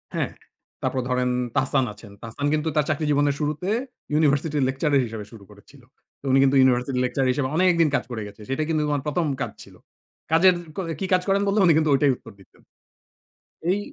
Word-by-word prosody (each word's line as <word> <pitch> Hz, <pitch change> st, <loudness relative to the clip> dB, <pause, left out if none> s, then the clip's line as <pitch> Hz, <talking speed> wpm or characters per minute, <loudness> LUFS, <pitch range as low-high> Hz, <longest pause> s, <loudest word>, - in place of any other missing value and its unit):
হ্যাঁ। -, -, -1 dB, 0.5 s
তারপর 130 Hz, -, -1 dB
ধরেন 125 Hz, 0 st, +1 dB, 0.3 s
তাহসান 135 Hz, 0 st, +2 dB
আছেন, 105 Hz, 0 st, -14 dB
তাহসান 115 Hz, +5 st, -5 dB
কিন্তু 155 Hz, +1 st, 0 dB
তার 150 Hz, -2 st, +2 dB
চাকরি 155 Hz, 0 st, 0 dB
জীবনের 145 Hz, 0 st, +2 dB
শুরুতে 150 Hz, +4 st, -2 dB, 0.5 s
university 150 Hz, 0 st, +1 dB
lecturer 140 Hz, +2 st, +1 dB
হিসেবে 110 Hz, -2 st, -7 dB
শুরু 110 Hz, -4 st, -13 dB
করেছিল। 105 Hz, +7 st, -18 dB, 0.4 s
তো -, -, -14 dB
উনি 135 Hz, -, +5 dB
কিন্তু 135 Hz, 0 st, +3 dB
university 125 Hz, +1 st, +1 dB
এর -, -, +1 dB
lecturer 130 Hz, +1 st, 0 dB
হিসেবে 135 Hz, 0 st, -1 dB
অনেকদিন 170 Hz, -2 st, +3 dB
কাজ -, -, 0 dB
করে 110 Hz, -, -4 dB
গেছে। 100 Hz, +2 st, -13 dB
সেটা 135 Hz, +3 st, -1 dB
কিন্তু 155 Hz, -1 st, +1 dB
উনার 145 Hz, -2 st, -1 dB
১ম 165 Hz, +3 st, 0 dB, 0.2 s
কাজ -, -, -2 dB
ছিল, -, -, -16 dB, 0.6 s
কাজের 180 Hz, +3 st, +6 dB, 0.2 s
ক -, -, -2 dB, 0.2 s
কি -, -, -2 dB
কাজ 185 Hz, -, +4 dB
করেন 195 Hz, +1 st, +2 dB
বললে 200 Hz, +2 st, +2 dB
উনি 170 Hz, -, +6 dB
কিন্তু 155 Hz, -1 st, +2 dB
ওইটাই 140 Hz, 0 st, +4 dB
উত্তর 115 Hz, -, -14 dB
দিতেন। 95 Hz, -, -21 dB, 1.1 s
এই 195 Hz, -, +2 dB
140 Hz, 195 wpm, -24 LUFS, 125-155 Hz, 1.1 s, কাজের